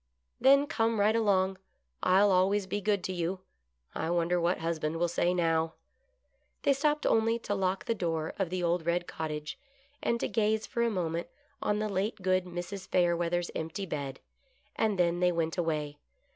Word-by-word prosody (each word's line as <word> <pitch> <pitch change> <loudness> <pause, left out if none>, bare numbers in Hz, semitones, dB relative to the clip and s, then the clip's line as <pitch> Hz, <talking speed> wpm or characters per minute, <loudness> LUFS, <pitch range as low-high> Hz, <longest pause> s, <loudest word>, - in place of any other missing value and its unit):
" 65 - -41
Then 275 +3 +6
come 225 -5 0
right 210 +2 +4
along; 190 -4 +2 0.4
I'll 195 +2 +4
always 190 +2 +3
be 205 +2 -3
good 200 -2 +1
to 185 - -2
you; 180 +1 -2 0.5
I 160 - -2
wonder 175 +1 +1
what 175 +2 +2
husband 160 -1 -2
will 175 +1 +2
say 175 +1 +1
now? 165 -2 +1 0.4
" - - -45
They 280 - +4
stopped 295 +2 0
only 225 +1 +3
to 230 - -3
lock 190 -1 -1
the 230 - +1
door 165 -6 -2
of 190 -3 0
the 180 0 -2
old 170 -1 0
red 175 +1 +1
cottage, 150 -2 -5 0.4
and 235 - 0
to - - -1
gaze 215 +1 +1
for 235 - -3
a 235 - +3
moment 170 -5 -2 0.3
on 210 -6 +1
the 215 0 -1
late 200 +2 -1
good 185 0 +2
Mrs. 180 +2 -6
Fayerweather's 175 -1 +1
empty 165 +5 -4
bed, 140 -6 -4 0.6
and 215 -3 +1
then 175 -1 +2
they 180 0 +3
went 165 -1 -1
away. 150 -4 -2
180 Hz, 185 wpm, -30 LUFS, 170-205 Hz, 0.6 s, Then